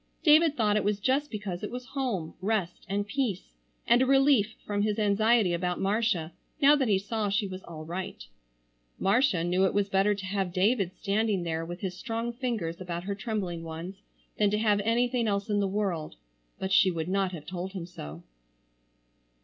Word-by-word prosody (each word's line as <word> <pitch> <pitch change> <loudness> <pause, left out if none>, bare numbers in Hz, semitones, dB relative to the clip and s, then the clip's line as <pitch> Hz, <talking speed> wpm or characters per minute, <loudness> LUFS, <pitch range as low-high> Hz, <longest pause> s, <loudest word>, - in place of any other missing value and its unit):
David 310 -1 +5
thought 210 -3 +3
it 210 - +1
was 205 0 0
just 275 +6 +1
because 200 -5 -5
it 210 - -4
was 250 +1 -6
home, 235 - -2
rest, 195 -3 -2
and 200 +1 0
peace, 210 -4 -2 0.3
and 240 +2 +5
a - - +4
relief 270 -5 +4
from 205 -1 -1
his 210 0 0
anxiety 215 -1 +3
about 180 +1 -1
Marcia 195 -5 0 0.3
now 290 0 +7
that 270 -4 +1
he 200 -3 +4
saw 210 +1 -2
she 200 +2 +1
was 190 -1 -6
all 155 -2 -8
right. 175 - -5 0.7
Marcia 200 -4 +2
knew 180 +2 +2
it 190 - +2
was 205 -1 +1
better 195 +2 +3
to 195 -1 -7
have 190 -1 -1
David 195 +1 +2
standing 205 -2 0
there 165 -1 -2
with 175 +2 -7
his 185 -2 -3
strong 230 +5 -3
fingers 225 -10 -3
about 175 -1 -4
her 200 +2 -2
trembling 200 -5 -3
ones, 165 +4 -7 0.4
than 210 -1 +4
to 210 - +1
have 210 -2 +2
anything 235 +2 +1
else 200 0 -1
in 205 - +2
the 200 - +1
world. 190 -6 -2 0.4
But 190 - -4
she 185 +1 +6
would 165 -2 -3
not 190 0 0
have 155 -4 -7
told 185 +1 -5
him 185 -4 -5
so. 80 - -9
200 Hz, 190 wpm, -28 LUFS, 180-225 Hz, 0.7 s, now